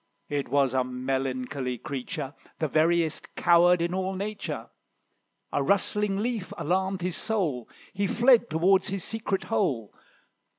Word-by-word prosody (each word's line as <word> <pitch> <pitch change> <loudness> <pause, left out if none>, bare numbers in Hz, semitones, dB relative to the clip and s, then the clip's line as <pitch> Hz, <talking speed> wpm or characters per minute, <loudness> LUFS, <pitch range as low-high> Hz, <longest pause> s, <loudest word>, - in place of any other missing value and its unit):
It 145 -3 -2
was 135 -1 +2
a 130 -1 +2
melancholy 130 0 -2
creature, 140 - -5 0.2
The 155 - 0
veriest 160 +1 +1
coward 175 0 +5
in 170 +1 -1
all 190 +1 -1
nature; 185 - -5 0.8
A - - +2
rustling 200 +5 +1
leaf 220 -2 -2
alarmed 190 +2 0
his 180 -1 -1
soul, 170 - -1 0.2
He 200 +1 0
fled 240 +2 +4
towards 185 +5 +3
his 195 -3 -2
secret 220 -3 -2
hole. 135 - -1
170 Hz, 130 wpm, -27 LUFS, 135-195 Hz, 0.8 s, coward